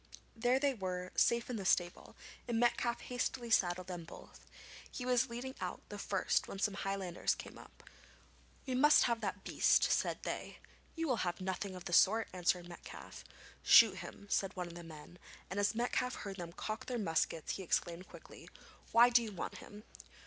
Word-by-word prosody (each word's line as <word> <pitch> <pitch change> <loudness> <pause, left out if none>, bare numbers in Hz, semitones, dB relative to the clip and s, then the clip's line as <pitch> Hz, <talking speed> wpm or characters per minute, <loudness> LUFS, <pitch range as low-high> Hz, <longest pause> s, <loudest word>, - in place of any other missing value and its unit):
There 245 +3 +2
they 280 -1 +2
were, 185 -4 -4
safe 235 0 +3
in 245 - -3
the 200 - -4
stable, 175 -1 0 0.3
and 235 -2 0
Metcalfe 240 0 +1
hastily 245 -1 -3
saddled 180 -3 +2
them 175 -2 -6
both. 165 - -14 0.4
He 250 - -6
was 250 0 +2
leading 245 +3 -5
out - - -4
the - - -7
first - - 0
when - - -7
some 205 +1 0
Highlanders 195 -3 -1
came - - -10
up. - - -16 0.8
'We 260 - -3
must 295 +4 +6
have 235 -2 0
that 200 -1 -3
beast,' - - +3
said - - +1
they. - - -5 0.4
'You 330 -1 -2
will 250 -4 +1
have 175 -3 -2
nothing 190 +1 -3
of 180 - -9
the 175 - -4
sort,' 220 +6 +5
answered 175 -1 0
Metcalfe. 175 - -10 0.4
'Shoot - - +7
him,' - - -9
said 195 -1 0
one 180 -1 -3
of 170 - -9
the 175 0 -9
men, 165 +2 -12 0.3
and 195 - -2
as 205 +2 +1
Metcalfe 245 +1 0
heard 195 -1 -7
them 170 -2 -6
cock 220 +7 -5
their 250 - -2
muskets 165 -5 -1
he - - -6
exclaimed 175 0 -1
quickly: - - -13 0.4
'Why 240 +2 +7
do 240 0 +6
you 225 -2 -5
want 190 - -6
him?' 210 +1 -12
200 Hz, 185 wpm, -35 LUFS, 180-240 Hz, 0.8 s, Shoot